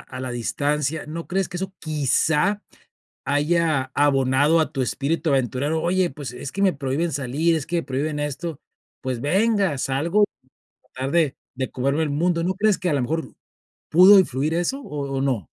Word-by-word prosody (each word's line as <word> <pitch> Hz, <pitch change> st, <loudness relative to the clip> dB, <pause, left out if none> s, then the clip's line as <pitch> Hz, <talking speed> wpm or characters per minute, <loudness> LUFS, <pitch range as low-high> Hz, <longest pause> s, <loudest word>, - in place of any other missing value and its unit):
a 130 Hz, -, -9 dB
la 130 Hz, -1 st, -4 dB
distancia, 145 Hz, +5 st, -1 dB
¿no 165 Hz, +2 st, -6 dB
crees 190 Hz, +1 st, -1 dB
que 180 Hz, -, -6 dB
eso 190 Hz, +1 st, -4 dB
quizá 155 Hz, -, +1 dB, 0.6 s
haya 150 Hz, -1 st, +1 dB
abonado 145 Hz, +2 st, +3 dB
a 160 Hz, -, -1 dB
tu 135 Hz, -, -1 dB
espíritu 150 Hz, +5 st, -1 dB
aventurero? 135 Hz, +4 st, 0 dB
Oye, 180 Hz, +1 st, +1 dB
pues: 135 Hz, -2 st, -7 dB
"Es 125 Hz, +2 st, -7 dB
que 200 Hz, -, -2 dB
me 190 Hz, -, +4 dB
prohíben 140 Hz, +4 st, -2 dB
salir, 145 Hz, +5 st, 0 dB
es 150 Hz, -, -4 dB
que 175 Hz, +2 st, -2 dB
me 170 Hz, -, 0 dB
prohíben 145 Hz, +3 st, -2 dB
esto", 145 Hz, +2 st, -4 dB, 0.4 s
pues 130 Hz, -2 st, -3 dB
venga, 195 Hz, -, +2 dB
salgo 155 Hz, +11 st, +1 dB
a 205 Hz, -10 st, -2 dB, 0.5 s
tratar 130 Hz, +2 st, -3 dB
de 160 Hz, -5 st, +2 dB, 0.2 s
de 130 Hz, 0 st, -3 dB
comerme 140 Hz, +4 st, 0 dB
el 155 Hz, -, -1 dB
mundo, 170 Hz, +3 st, 0 dB
¿no 185 Hz, -, +1 dB
crees 210 Hz, 0 st, +2 dB
que 180 Hz, -, -2 dB
a 150 Hz, -, +1 dB
la 140 Hz, -, +1 dB
mejor 160 Hz, +6 st, -3 dB, 0.6 s
pudo 185 Hz, +5 st, +8 dB
influir 150 Hz, -3 st, 0 dB
eso 220 Hz, +12 st, -1 dB
o 140 Hz, -, -5 dB
o -, -, 0 dB
no? 125 Hz, -, -1 dB
150 Hz, 185 wpm, -23 LUFS, 135-170 Hz, 0.6 s, pudo